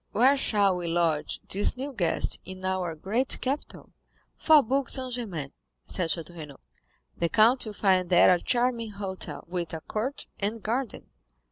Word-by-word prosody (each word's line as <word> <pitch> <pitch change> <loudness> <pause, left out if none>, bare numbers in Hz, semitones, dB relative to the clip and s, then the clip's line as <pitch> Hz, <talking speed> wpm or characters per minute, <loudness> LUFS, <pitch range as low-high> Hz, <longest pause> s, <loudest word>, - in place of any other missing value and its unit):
Where 260 +5 +5
shall 205 -8 +2
we 175 -1 -4
lodge 165 -3 0
this 205 +5 +2
new 275 +2 -5
guest 175 -8 0
in 185 0 -9
our 185 -3 -1
great 220 +11 0
capital?" 275 +3 -4 0.4
"Faubourg 275 -4 +3
Saint 255 -2 -1
Germain," 180 - -4 0.3
said 175 -3 -2
Château 170 +1 -2
Renaud. 150 -4 -10 0.6
"The 170 - 0
count 230 +4 +3
will 215 - -6
find 185 -3 +2
there 180 0 +6
a 175 - 0
charming 240 -3 0
hotel, 195 -2 -5
with 170 -2 -4
a 160 - -7
court 235 - -4
and 210 +2 -3
garden." 240 +2 -3
200 Hz, 155 wpm, -27 LUFS, 175-245 Hz, 0.6 s, there